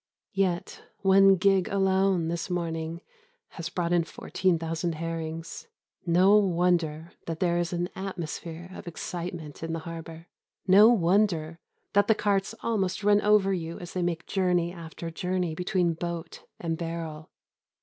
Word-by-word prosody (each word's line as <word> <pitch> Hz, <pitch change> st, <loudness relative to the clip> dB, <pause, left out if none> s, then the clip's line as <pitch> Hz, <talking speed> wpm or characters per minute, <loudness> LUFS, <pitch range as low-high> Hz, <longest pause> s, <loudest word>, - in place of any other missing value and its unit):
Yet 185 Hz, -3 st, -1 dB, 0.2 s
one 195 Hz, 0 st, +6 dB
gig 190 Hz, 0 st, +3 dB
alone 190 Hz, -3 st, +2 dB
this 170 Hz, +3 st, -3 dB
morning 165 Hz, -1 st, -3 dB, 0.5 s
has 170 Hz, -1 st, -6 dB
brought 175 Hz, -1 st, -1 dB
in 175 Hz, -1 st, +3 dB
fourteen 175 Hz, +2 st, -1 dB
thousand 165 Hz, +1 st, -2 dB
herrings. 165 Hz, 0 st, -5 dB, 0.4 s
No 185 Hz, +5 st, +6 dB
wonder 170 Hz, -4 st, +1 dB, 0.2 s
that 165 Hz, -1 st, -4 dB
there 175 Hz, -1 st, +2 dB
is 175 Hz, -1 st, -1 dB
an 175 Hz, 0 st, -1 dB
atmosphere 175 Hz, -2 st, -6 dB
of -, -, -10 dB
excitement 170 Hz, -2 st, -6 dB
in 165 Hz, 0 st, -3 dB
the 165 Hz, -, -2 dB
harbour. 165 Hz, 0 st, -8 dB, 0.4 s
No 200 Hz, +4 st, +8 dB
wonder 175 Hz, -5 st, +2 dB, 0.3 s
that 205 Hz, 0 st, +4 dB
the 220 Hz, -, +5 dB
carts 205 Hz, 0 st, 0 dB
almost 200 Hz, -4 st, -1 dB
run 205 Hz, 0 st, +5 dB
over 205 Hz, -2 st, +4 dB
you 165 Hz, -2 st, -4 dB
as 175 Hz, -, -9 dB
they 185 Hz, -, -1 dB
make 170 Hz, -1 st, -2 dB
journey 180 Hz, -3 st, +1 dB
after 165 Hz, -1 st, -7 dB
journey 180 Hz, -1 st, -1 dB
between 180 Hz, 0 st, 0 dB
boat 170 Hz, 0 st, -6 dB
and 165 Hz, -1 st, -3 dB
barrel. 165 Hz, -2 st, -5 dB
175 Hz, 145 wpm, -27 LUFS, 165-190 Hz, 0.5 s, No